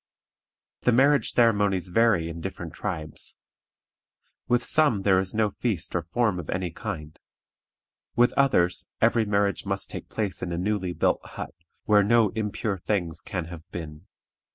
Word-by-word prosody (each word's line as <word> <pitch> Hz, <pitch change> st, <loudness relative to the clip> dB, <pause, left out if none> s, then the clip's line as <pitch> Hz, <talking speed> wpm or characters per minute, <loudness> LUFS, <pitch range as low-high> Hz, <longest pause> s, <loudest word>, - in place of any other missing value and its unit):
The 125 Hz, -, +3 dB
marriage 140 Hz, +4 st, +4 dB
ceremonies 100 Hz, -6 st, +2 dB
vary 100 Hz, -4 st, +3 dB
in 85 Hz, 0 st, -6 dB
different -, -, -6 dB
tribes. 75 Hz, -1 st, -5 dB, 1.1 s
With 120 Hz, 0 st, +2 dB
some 145 Hz, -11 st, +3 dB
there 95 Hz, -2 st, +4 dB
is 95 Hz, +2 st, -2 dB
no 110 Hz, -1 st, +2 dB
feast 100 Hz, -10 st, -3 dB
or 90 Hz, -, +1 dB
form 95 Hz, +3 st, 0 dB
of 80 Hz, -, -8 dB
any 90 Hz, -2 st, -2 dB
kind; 75 Hz, -1 st, -6 dB, 1.0 s
with 120 Hz, +1 st, +4 dB
others 90 Hz, -11 st, +2 dB
every 115 Hz, -2 st, +3 dB
marriage 100 Hz, -1 st, +1 dB
must 95 Hz, -1 st, -3 dB
take -, -, -7 dB
place 100 Hz, -6 st, -3 dB
in 90 Hz, -, -3 dB
a 85 Hz, -, -2 dB
newly 95 Hz, -1 st, -1 dB
built -, -, +1 dB
hut, -, -, -7 dB, 0.3 s
where 105 Hz, -1 st, +5 dB
no 110 Hz, +1 st, +4 dB
impure 105 Hz, -1 st, -2 dB
things 85 Hz, -4 st, -2 dB
can 90 Hz, -5 st, -4 dB
have 85 Hz, -, -8 dB
been. 80 Hz, +1 st, -8 dB
100 Hz, 155 wpm, -26 LUFS, 85-110 Hz, 1.1 s, where